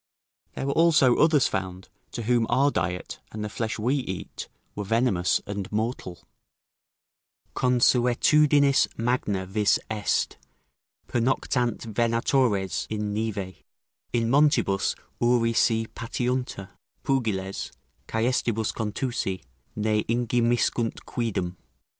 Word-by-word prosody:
There - - -3
were 140 - 0
also 155 -6 +5
others 155 -3 +4
found, 95 -1 -4 0.3
to 120 - -4
whom 120 0 +2
our 135 +4 +3
diet, 90 -5 -3
and 105 -1 -5
the - - -4
flesh 110 +1 -3
we 125 +6 +1
eat, 95 - -5 0.3
were 105 - -4
venomous 115 -4 +1
and 100 -2 -5
mortal: 105 -6 -3 1.3
"Consuetudinis 130 +3 +4
magna 115 -5 -1
vis 100 +2 +2
est: 105 -2 0 0.7
pernoctant 120 -1 0
venatores 115 - +1
in 105 -1 -2
nive: 105 -3 -3 0.5
in 115 -1 +1
montibus 135 -7 +2 0.2
uri 120 -1 +2
se 115 0 +2
patiuntur: 125 -4 -3 0.3
pugiles, 105 -8 -1 0.4
caestibus 115 -1 0
contusi, 110 - -3 0.3
ne 105 0 +1
ingemiscunt 120 0 0
quidem." 95 -7 -3
115 Hz, 100 wpm, -26 LUFS, 105-125 Hz, 1.3 s, also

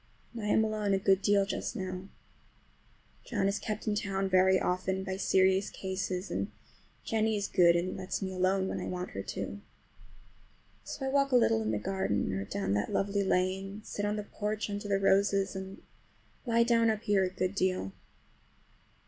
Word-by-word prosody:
And 235 - -6
I - - -2
am 220 +1 +4
alone 210 -2 0
a - - +2
good 195 0 +3
deal 200 -1 +3
just 195 - -3
now. 185 -2 -5 1.2
John 205 -5 0
is 200 +1 0
kept 215 -1 -4
in 215 - +1
town 195 -2 -1
very 185 0 +5
often 185 +1 -1
by 190 -1 -3
serious 190 0 +3
cases, 190 0 -4
and - - -2 0.5
Jennie 220 -1 +1
is 200 - -2
good 170 -2 +5
and 175 +2 -1
lets 185 -1 -3
me 190 -1 -3
alone 190 +1 +1
when - - -3
I - - -4
want 180 0 -4
her 95 - -4
to. 205 - -5 1.2
So 270 - -5
I - - 0
walk 275 0 +2
a - - +4
little 115 - +4
in 110 - -1
the 110 - 0
garden 105 - -1
or 95 +1 -2
down 100 0 -2
that 100 0 -1
lovely 200 0 +1
lane, 190 +2 -1
sit 205 - -4
on 205 0 0
the 210 - -3
porch 210 +1 -3
under 205 0 -4
the 200 -1 +2
roses, 195 0 +2
and 190 0 -7 0.6
lie 235 0 +4
down 230 -1 +3
up 215 0 -1
here 200 -2 +3
a 185 - 0
good 185 +1 -2
deal. 185 - 0
195 Hz, 190 wpm, -30 LUFS, 185-205 Hz, 1.2 s, very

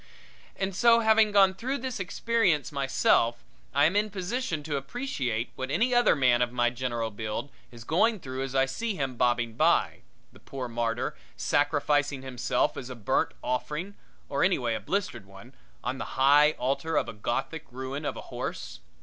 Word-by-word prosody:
And 190 -1 -3
so, 235 +3 +5
having 220 -1 +4
gone 195 -2 +5
through 255 +8 -3
this 255 -3 -4
experience 190 -5 +1
myself, 135 -4 +2 0.3
I 140 +3 +4
am 165 +5 +2
in 210 +1 +2
position 195 - -3
to 150 -1 -3
appreciate 135 - -3
what 130 0 -4
any 240 - +1
other 245 0 +5
man 125 -3 +3
of 120 -1 +1
my 120 -1 +1
general 120 -2 -3
build 110 +6 -5 0.2
is 120 -2 -12
going 210 - +2
through 130 -4 -5
as 135 0 -4
I 135 0 +4
see 205 +11 -3
him 135 -5 -3
bobbing 120 -1 +1
by - - +2 0.3
the - - -16
poor 130 -2 -6
martyr, 115 0 -2 0.2
sacrificing 145 -1 +1
himself 125 -1 -1
as 130 - -6
a 130 - -6
burnt 110 -4 0
offering, 150 +9 -3 0.3
or - - 0
anyway 120 -2 +2
a - - -2
blistered 150 - -3
one 100 +7 -14 0.3
on 130 +2 -3
the - - -6
high 145 +3 +6
altar 140 +5 -1
of - - +1
a - - -6
Gothic 120 +9 -3
ruin 130 +3 -5
of - - -3
a - - -6
horse. - - -6
140 Hz, 175 wpm, -28 LUFS, 125-190 Hz, 0.3 s, high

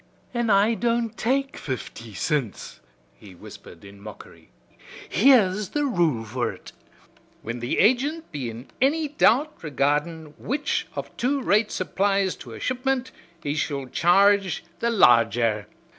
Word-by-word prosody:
"An' 240 -2 -1
I 205 +3 +4
don't 230 -1 -1
take 270 +4 -1
fifty 115 -5 -7
cints," 140 - -3 0.4
he 95 -3 -14
whispered 85 +1 -13
in 100 0 -14
mockery. 105 0 -13 0.6
"Here's 210 -4 +4
the 295 -1 -1
rule 165 - 0
for 120 +3 -2
ut. - - -13 0.7
'Whin 115 +2 -5
the 120 +1 -2
agint 270 - +2
be 135 -6 -4
in 115 +3 -10
anny 300 +3 +2
doubt 295 0 +3
regardin' 150 +2 -1
which 285 +5 -2
of - - -6
two 275 +4 0
rates 215 0 +1
applies 195 0 0
to - - -11
a - - -9
shipment, 255 0 -1 0.3
he 145 - -1
shall 140 -3 -2
charge 195 +5 +3 0.2
the 235 - 0
larger. 115 - +3
190 Hz, 135 wpm, -24 LUFS, -, 0.7 s, I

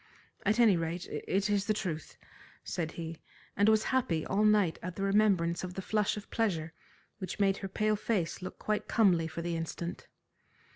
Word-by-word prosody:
"At 215 +3 +3
any 220 -6 +6
rate, 165 +2 -3
it 195 +2 -1
is 205 -1 +1
the 215 - +2
truth," 165 -7 -4 0.5
said 165 -3 -3
he, 165 -1 -6 0.3
and 205 +2 +4
was 220 0 +4
happy 170 -12 +1
all 200 +2 +1
night 210 -6 +3
at 180 0 -5
the 195 - -3
remembrance 195 -4 +2
of 180 0 -5
the 190 - -3
flush 210 0 +1
of 210 - -9
pleasure 165 -8 0 0.5
which 185 +1 -5
made 195 -1 +3
her 195 - -5
pale 215 +2 +1
face 205 -6 -1
look 185 - -6
quite 215 0 -2
comely 180 -8 +3
for 165 +1 -5
the 170 0 -2
instant. 165 +1 -5
195 Hz, 185 wpm, -31 LUFS, 170-210 Hz, 0.5 s, any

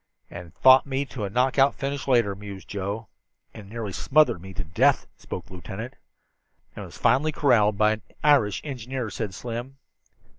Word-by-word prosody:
"And 85 -2 -10
fought 130 +1 +6
me 135 +1 -1
to 120 -6 -5
a - - -4
knockout 130 +5 +3
finish 140 0 -4
later," 120 -6 +3
mused 100 -1 -10
Joe. 100 +2 -4 0.5
"And 105 -3 -11
nearly 110 -2 -5
smothered 150 - +3
me 95 +1 -10
to - - -3
death," 75 - +2
spoke - - -7
the - - -15
lieutenant. 100 +7 -7 0.8
"And - - -7
was - - -12
finally 135 +7 +2
corralled 115 -9 +3
by 105 +1 +4
an 110 0 -3 0.2
Irish 135 -9 +3
engineer!" 130 -4 -5
said 105 -5 -4
Slim. 120 +4 -6
115 Hz, 170 wpm, -25 LUFS, 100-135 Hz, 0.8 s, fought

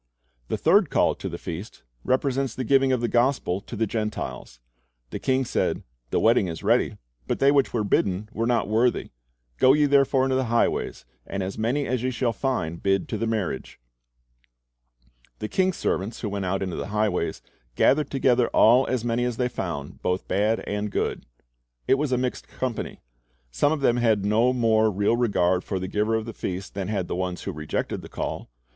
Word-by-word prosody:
The - - -1
third 185 +1 +4
call - - +3
to - - -6
the - - -5
feast 90 +6 -7 0.2
represents 135 -1 0
the 130 - -3
giving 135 +1 +3
of 125 -2 +1
the 120 - +1
gospel 120 -6 +1
to 120 - -9
the 110 +1 +1
Gentiles. 105 - -4 0.5
The - - -4
king 130 0 +1
said, - - -1 0.3
"The - - +1
wedding 110 -4 +4
is 80 -1 -6
ready, - - +2 0.3
but - - 0
they 140 +1 +4
which 140 -2 +3
were 115 -3 0
bidden 100 0 0
were 115 +1 -1
not 120 -1 +1
worthy. 115 +3 +1 0.5
Go 130 - +6
ye 150 0 +4
therefore 140 -1 +3
into 130 0 +1
the 130 - 0
highways, 115 - 0 0.2
and 95 - -3
as 95 +1 -4
many 125 +6 0
as 125 -2 -1
ye 130 - 0
shall 120 -2 -1
find, 90 - -2
bid 95 -1 +1
to 110 - -2
the 115 - -1
marriage." 105 -12 -3 1.6
The 110 - -4
king's 185 - +1
servants 100 +5 -2
who 105 - -2
went 100 -1 -3
out 95 +1 -1
into 95 -3 -4
the - - -4
highways 105 -4 -1 0.3
"gathered 150 - +3
together 125 -3 +2
all 125 +4 +5
as 125 -2 -1
many 120 +1 0
as 125 -2 -2
they 125 -1 0
found, 75 -10 -5
both 90 +1 -1
bad 105 +4 +1
and 105 +1 -3
good." - - -2 0.6
It 135 - +4
was 150 -2 -1
a 125 - +2
mixed 125 0 -3
company. 125 -3 -4 0.5
Some 100 - +2
of 155 -2 -1
them 120 -3 +3
had 110 -4 +2
no 110 +4 +3
more 110 -3 +3
real 105 +3 +1
regard 95 -6 +1
for 95 - -3
the 95 0 -3
giver 105 +3 0
of 110 -1 -1
the 115 - -6
feast 95 0 -5
than 95 -2 -3
had 95 -4 -2
the - - -3
ones 90 0 -3
who - - -3
rejected 75 0 -3
the - - -11
call. - - -5
115 Hz, 200 wpm, -25 LUFS, 100-130 Hz, 1.6 s, Go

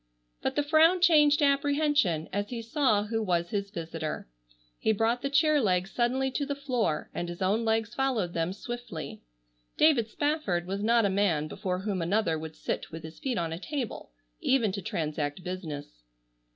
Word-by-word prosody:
But - - -1
the 290 - +2
frown 320 +4 +5
changed 300 -4 +6
to 295 - +3
apprehension, 280 - +2
as 205 +1 -1
he 235 -2 -5
saw 230 -4 +2
who 225 +1 -2
was 175 -4 0
his 200 -1 -2
visitor. 165 - -5 0.5
He 220 - +2
brought 225 +3 +1
the 275 - -1
chair 300 +1 +4
legs 185 -3 +1
suddenly 260 +2 +1
to 285 - -1
the 285 0 -2
floor 245 - -1
and 175 - -3
his 175 - -7
own 200 +5 +1
legs 225 0 0
followed 240 -10 0
them 165 +1 0
swiftly. 195 - -7 0.6
David 275 -8 +4
Spafford 290 - -1
was 195 +2 -3
not 230 +1 +3
a - - +3
man 185 -6 +1
before 180 +3 -3
whom 195 -3 -2
another 170 -2 +1
would 160 0 -7
sit - - -4
with 160 0 -8
his 160 0 -10
feet 260 -3 -2
on 165 -2 -1
a 165 - -5
table, 265 +1 -4 0.3
even 260 - +2
to 200 +1 -4
transact 155 -1 -3
business. 155 - -6
215 Hz, 180 wpm, -28 LUFS, 175-270 Hz, 0.6 s, changed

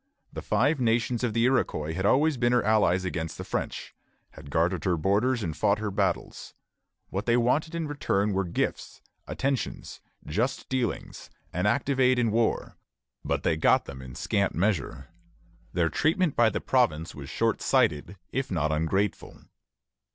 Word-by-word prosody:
The - - -5
Five 135 +8 +1
Nations 115 0 +1
of 120 -3 0
the 115 - +2
Iroquois 80 - 0
had 95 +4 0
always 150 +5 +3
been 120 0 +1
her 125 - +3
allies 100 -4 +2
against 80 -3 -4
the - - -5
French, - - -4 0.4
had 75 -2 -12
guarded 85 +5 0
her 90 -4 +1
borders 110 +8 +1
and 80 -3 -3
fought 100 +7 +2
her 105 -1 -3
battles. - - -2 0.6
What 100 +5 -3
they 120 0 +4
wanted 145 +7 +1
in 165 -2 -2
return 105 -8 0
were 95 +1 +1
gifts, 85 - -3 0.2
attentions, 135 -2 -3 0.2
just 115 - -2
dealings, 130 -5 -3 0.2
and - - 0
active 135 -1 0
aid 130 -1 +4
in 115 -3 +2
war; 115 +1 0 0.5
but - - -1
they 80 - +2
got 80 - +3
them 65 -1 -9
in 65 -1 -10
scant 100 +6 0
measure. 85 - -1 0.6
Their 85 -2 +1
treatment 160 - +1
by 120 -1 +5
the - - -3
province 85 -11 +1
was 70 -2 -9
short - - 0
sighted, 75 +7 +1
if 135 0 -2
not 80 -4 0
ungrateful. 85 +6 -1
105 Hz, 165 wpm, -27 LUFS, 85-125 Hz, 0.6 s, by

